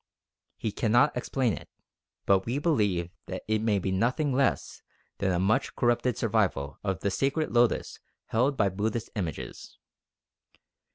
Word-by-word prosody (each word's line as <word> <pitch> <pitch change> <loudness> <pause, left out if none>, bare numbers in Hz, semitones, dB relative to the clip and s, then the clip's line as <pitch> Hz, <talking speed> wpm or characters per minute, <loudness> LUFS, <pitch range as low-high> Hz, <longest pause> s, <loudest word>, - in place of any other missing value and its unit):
He 110 - -2
cannot 120 +7 +3
explain 125 -2 0
it, - - -8 0.6
but 95 0 +3
we 120 +4 0
believe 105 - +1 0.2
that - - -5
it 110 0 +1
may 110 -2 +2
be 95 0 -1
nothing 125 +9 +1
less 135 +1 0 0.4
than 95 -1 +1
a 90 - +1
much 95 +5 +1
corrupted 120 0 +1
survival 70 +1 0
of 95 -4 -2
the 100 - 0
sacred 140 +8 0
lotus 120 -1 +2 0.3
held 130 +5 +1
by 100 -2 +3
Buddhist 105 +4 -2
images. 85 -8 -5
110 Hz, 145 wpm, -28 LUFS, 95-125 Hz, 0.6 s, cannot